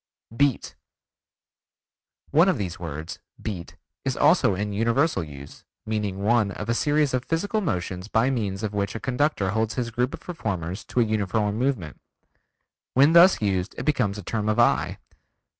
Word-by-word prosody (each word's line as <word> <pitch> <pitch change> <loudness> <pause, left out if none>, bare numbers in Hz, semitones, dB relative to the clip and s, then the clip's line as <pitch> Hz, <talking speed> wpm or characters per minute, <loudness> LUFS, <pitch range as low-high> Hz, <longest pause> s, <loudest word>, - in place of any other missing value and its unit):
Beat 140 -1 +1 1.6
One 165 +6 +5
of 185 - +1
these 90 -3 -4
words, 80 -1 -6 0.2
Beat, 90 -6 -6 0.3
is 135 -2 -2
also 150 - +4
in 105 +2 -3
universal 115 - +1
use, 70 -2 -11 0.2
meaning 105 -3 -2
one 110 -1 +3
of 105 +2 -6
a - - +3
series 145 +2 +1
of 125 -1 0
physical 205 +6 -1
motions 90 - -3
by 115 +4 +2
means 105 -5 -2
of 105 -1 -2
which 100 +1 -2
a - - -3
conductor 125 -7 0
holds 110 +1 -1
his 120 -2 -2
group 125 +3 -1
of - - -14
performers 95 - -4
to 125 - 0
a - - +3
uniform 105 0 0
movement. 120 - -2 0.9
When 140 +5 +6
thus 170 - +7
used 95 -2 -1
it - - -5
becomes 120 -9 +1
a 105 - -7
term 110 -2 -2
of 110 - +1
eye. - - +2
110 Hz, 165 wpm, -25 LUFS, 100-135 Hz, 1.6 s, thus